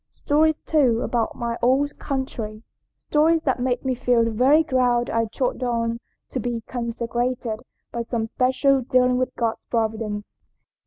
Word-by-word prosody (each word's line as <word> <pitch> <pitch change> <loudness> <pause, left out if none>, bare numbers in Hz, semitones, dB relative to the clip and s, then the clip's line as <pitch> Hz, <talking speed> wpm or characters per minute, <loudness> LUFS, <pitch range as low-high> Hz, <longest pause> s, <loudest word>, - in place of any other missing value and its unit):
Stories 310 +1 +1
too 255 -7 +2
about 235 -2 -1
my 235 -1 -3
own 265 +4 +3
country. 235 -7 -5 0.3
Stories 320 +2 +2
that 265 -2 0
made 250 +1 -1
me 260 - +1
feel 245 -1 +2
the 230 - 0
very 265 +8 +4
ground 250 -4 +1
I 230 0 +1
trod 250 +4 -2
on 230 -1 -1 0.3
to 260 - -3
be 235 0 -2
consecrated 235 -1 -2 0.3
by 235 - -3
some 230 -1 -2
special 260 +3 +2
dealing 250 0 +2
of 255 0 0
God's 230 -2 -1
Providence." 220 -2 -3
245 Hz, 150 wpm, -23 LUFS, 230-260 Hz, 0.3 s, very